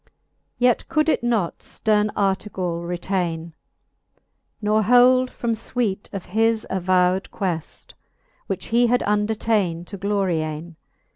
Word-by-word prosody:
Yet 245 Hz, -1 st, +2 dB
could 305 Hz, -1 st, +2 dB
It 310 Hz, -, +1 dB
not 225 Hz, -8 st, 0 dB
fterne 210 Hz, -1 st, 0 dB
Artegall 190 Hz, -3 st, -1 dB
retaine, 175 Hz, -2 st, -2 dB, 1.1 s
Nor 215 Hz, 0 st, +2 dB
hold 250 Hz, +3 st, +5 dB
from 235 Hz, -2 st, -3 dB
fuite 220 Hz, -3 st, -3 dB
of 195 Hz, -2 st, -6 dB
his 225 Hz, 0 st, +2 dB
avowed 185 Hz, 0 st, +1 dB
queft, 175 Hz, -5 st, -5 dB, 0.5 s
Which -, -, -3 dB
he 240 Hz, +1 st, +5 dB
had 245 Hz, +1 st, +2 dB
undertane 210 Hz, -4 st, 0 dB
to 200 Hz, -, -8 dB
Gloriam 175 Hz, -5 st, -1 dB
j. -, -, -20 dB
200 Hz, 120 wpm, -22 LUFS, 180-225 Hz, 1.1 s, hold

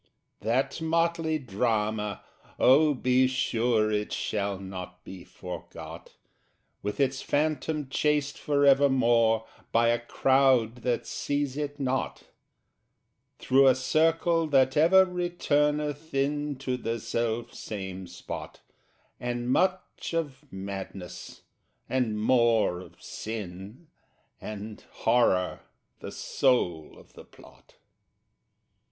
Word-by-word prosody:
That 125 Hz, +8 st, 0 dB
motley 165 Hz, -1 st, +1 dB
drama 110 Hz, -4 st, -1 dB, 0.3 s
oh, 145 Hz, +3 st, +5 dB
be 130 Hz, +1 st, +3 dB
sure 115 Hz, -4 st, +1 dB
It 105 Hz, 0 st, -1 dB
shall 100 Hz, -2 st, -2 dB
not 90 Hz, -1 st, -8 dB
be 95 Hz, -2 st, -10 dB
forgot! 90 Hz, -1 st, -9 dB, 0.7 s
With 105 Hz, +5 st, -4 dB
its 135 Hz, -1 st, +1 dB
Phantom 155 Hz, 0 st, -1 dB
chased 145 Hz, +1 st, 0 dB
for 145 Hz, -1 st, +1 dB
evermore, 120 Hz, -5 st, +4 dB, 0.3 s
By 115 Hz, 0 st, +4 dB
a 120 Hz, 0 st, +2 dB
crowd 130 Hz, -1 st, +2 dB
that 120 Hz, 0 st, -1 dB
seize 145 Hz, -2 st, -2 dB
it 145 Hz, 0 st, -4 dB
not, 130 Hz, -1 st, -2 dB, 1.1 s
Through 135 Hz, +1 st, +4 dB
a 130 Hz, -, +6 dB
circle 165 Hz, +4 st, +2 dB
that 135 Hz, -2 st, +3 dB
ever 180 Hz, +5 st, +6 dB
returneth 150 Hz, -4 st, -1 dB
in 145 Hz, +1 st, 0 dB
To 130 Hz, -1 st, -3 dB
the 115 Hz, -1 st, -3 dB
self 115 Hz, +1 st, -2 dB
same 95 Hz, -3 st, -6 dB
spot, 85 Hz, -, -8 dB, 0.6 s
And 120 Hz, 0 st, -2 dB
much 185 Hz, 0 st, 0 dB
of 145 Hz, -3 st, -4 dB
Madness, 95 Hz, -2 st, -7 dB, 0.4 s
and 120 Hz, -5 st, 0 dB
more 115 Hz, -5 st, +3 dB
of 90 Hz, -, -14 dB
Sin, 105 Hz, -, -7 dB, 0.6 s
And 105 Hz, 0 st, -7 dB, 0.2 s
Horror 110 Hz, -6 st, +3 dB, 0.4 s
the -, -, -7 dB
soul 90 Hz, -, 0 dB
of -, -, -18 dB
the -, -, -12 dB
plot. -, -, -19 dB
130 Hz, 105 wpm, -28 LUFS, 110-145 Hz, 1.1 s, a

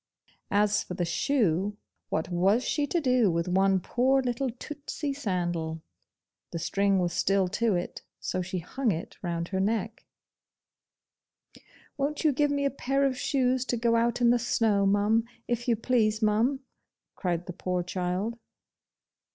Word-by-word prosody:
As 205 Hz, 0 st, +3 dB
for 180 Hz, -, -6 dB
the 175 Hz, -1 st, -1 dB
shoe, 205 Hz, -, +1 dB, 0.3 s
what 160 Hz, +2 st, -1 dB
was 190 Hz, +7 st, +2 dB
she 295 Hz, -2 st, 0 dB
to 345 Hz, -, +1 dB
do 250 Hz, -, +3 dB
with 170 Hz, 0 st, 0 dB
one 190 Hz, +1 st, +3 dB
poor 255 Hz, +8 st, +2 dB
little 255 Hz, +2 st, -1 dB
tootsey 290 Hz, +3 st, -5 dB
sandal? 175 Hz, -, -2 dB, 0.7 s
the -, -, -5 dB
string 195 Hz, +4 st, +1 dB
was 175 Hz, -2 st, 0 dB
still 195 Hz, 0 st, +2 dB
to 220 Hz, +1 st, +1 dB
it, 175 Hz, -, -4 dB, 0.2 s
so 185 Hz, -, -2 dB
she 185 Hz, +1 st, -4 dB
hung 225 Hz, +8 st, -1 dB
it 165 Hz, -1 st, -5 dB
round 170 Hz, -2 st, -3 dB
her 190 Hz, -, -1 dB
neck. 220 Hz, +2 st, -1 dB, 1.9 s
'Won't 290 Hz, +2 st, -1 dB
you 310 Hz, -, +5 dB
give 290 Hz, +2 st, +2 dB
me 285 Hz, 0 st, 0 dB
a 280 Hz, -, +2 dB
pair 275 Hz, +1 st, 0 dB
of 265 Hz, -1 st, +1 dB
shoes 255 Hz, -1 st, +1 dB
to 245 Hz, -, -1 dB
go 230 Hz, 0 st, +2 dB
out 235 Hz, +1 st, +1 dB
in 235 Hz, -1 st, +5 dB
the 245 Hz, -, +3 dB
snow, 215 Hz, -4 st, +2 dB
mum, 205 Hz, +3 st, +3 dB, 0.2 s
if 240 Hz, 0 st, -2 dB
you 235 Hz, -, +4 dB
please, 220 Hz, -2 st, +1 dB
mum?' 225 Hz, +5 st, +2 dB, 0.5 s
cried 175 Hz, -1 st, -2 dB
the 180 Hz, -, -6 dB
poor 180 Hz, 0 st, -2 dB
child. 185 Hz, +6 st, -2 dB
215 Hz, 160 wpm, -28 LUFS, 180-250 Hz, 1.9 s, you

